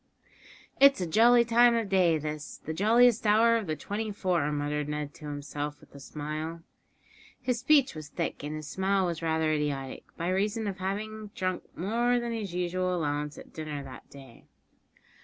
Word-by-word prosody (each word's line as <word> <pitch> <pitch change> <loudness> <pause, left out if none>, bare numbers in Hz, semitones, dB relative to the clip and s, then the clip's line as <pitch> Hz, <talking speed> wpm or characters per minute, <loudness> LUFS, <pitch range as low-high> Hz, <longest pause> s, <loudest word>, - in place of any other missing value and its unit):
"It's 275 0 +7
a 180 - -1
jolly 235 +7 +5
time 235 +1 +5
of 230 -2 0
day 180 -4 +3
this 150 0 -5
the 160 - -3
jolliest 225 +4 +4
hour 225 +2 +5
of 220 -4 -1
the 155 - -1
twenty 215 +6 -4
four," 180 -7 0
muttered 145 0 -2
Ned 150 -1 -4
to 150 - -12
himself, 145 0 -5
with - - -20
a 140 - -11
smile. 155 +3 -5 0.8
His 250 -2 -1
speech 285 0 +4
was 155 -2 -8
thick, - - -3
and 150 +1 -4
his 155 -1 -7
smile 190 +3 +1
was 170 -2 -3
rather 160 -1 +1
idiotic, 140 -3 -3
by 170 +2 -2
reason 205 +4 0
of 195 -2 -3
his - - -13
having 215 +3 -4
drunk 185 -1 -2
more 235 +7 +1
than 240 0 -3
his 215 -5 -4
usual 180 +1 0
allowance 150 -2 -2
at - - -12
dinner 150 -3 -5
that 130 -1 -11
day. 135 -4 -14
175 Hz, 180 wpm, -29 LUFS, 150-215 Hz, 0.8 s, It's